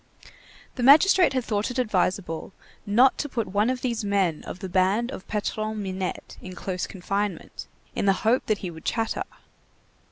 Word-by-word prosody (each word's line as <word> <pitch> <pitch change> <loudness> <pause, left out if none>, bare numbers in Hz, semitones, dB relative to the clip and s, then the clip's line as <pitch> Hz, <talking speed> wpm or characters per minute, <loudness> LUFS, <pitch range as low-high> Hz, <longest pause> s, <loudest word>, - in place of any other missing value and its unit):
The - - -2
magistrate 315 +8 +6
had 255 -1 0
thought 210 0 -1
it 250 - -5
advisable 190 -6 -1 0.3
not 240 +6 +4
to 290 - -2
put 230 -6 -2
one 205 +4 +2
of 255 -1 -2
these 235 -4 -1
men 195 -6 0
of - - -6
the 190 - -6
band 195 +7 +1
of 190 - -9
Patron 215 +1 -2
Minette 190 -1 -5
in 185 -1 -9
close 180 0 -3
confinement, 195 -1 -4 0.3
in - - -1
the 195 - +6
hope 240 +4 +2
that 215 - +2
he 175 - -4
would 160 -1 -12
chatter. 225 -1 -1
205 Hz, 170 wpm, -25 LUFS, 185-240 Hz, 0.3 s, magistrate